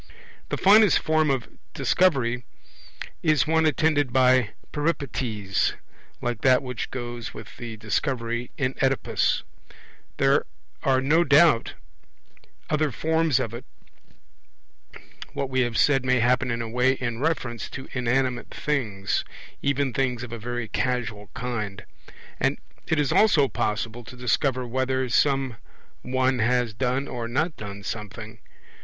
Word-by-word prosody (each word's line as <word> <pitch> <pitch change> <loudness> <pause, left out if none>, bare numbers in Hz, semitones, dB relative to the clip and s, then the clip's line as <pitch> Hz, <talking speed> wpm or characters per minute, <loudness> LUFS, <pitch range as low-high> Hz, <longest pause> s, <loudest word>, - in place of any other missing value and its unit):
The - - -1
finest 210 0 +6
form 155 -1 +2
of 135 -3 0 0.3
Discovery 125 -9 +2 0.8
is 155 -2 +3
one 160 0 +3
attended 150 -4 +2
by 130 -3 +4 0.2
Peripeties, 125 -10 -1 0.5
like 120 -2 -2
that 130 -1 +4
which 125 -2 -4
goes 120 -2 -6
with - - -10
the 115 -2 -7
Discovery 120 +2 -2
in 130 -2 0
Oedipus. 135 0 +1 0.7
There - - +3 0.3
are 130 -1 +2
no 155 +6 +4
doubt 150 -4 +4 0.9
other 155 -1 +1
forms 160 +1 +1
of 115 - -3
it; 120 +1 -7 1.7
what 135 -1 -3
we 130 0 +2
have 120 -3 0
said 135 -3 +4
may 130 -1 +2
happen 125 +2 +2
in 115 0 -1
a - - -5
way 125 +3 +2
in 120 -3 -4
reference 130 -7 -2
to 135 - -8
inanimate 125 0 0
things, 110 -10 -1 0.4
even 140 -2 0
things 125 -3 0
of 120 - -8
a 115 - -5
very 120 +1 -4
casual 110 -4 -2
kind; 110 -5 -4 0.5
and - - +1 0.3
it 160 - +1
is 145 -3 +1
also 180 -10 +5
possible 115 +1 -2
to 125 - -11
discover 125 +1 0
whether 130 +1 -1
some 135 -2 +2 0.4
one 130 0 0
has 120 0 +1
done 130 +4 -1
or 120 -2 -4
not 155 +8 -1
done 100 -1 -8
something. 105 -1 -7
125 Hz, 135 wpm, -25 LUFS, 120-140 Hz, 1.7 s, finest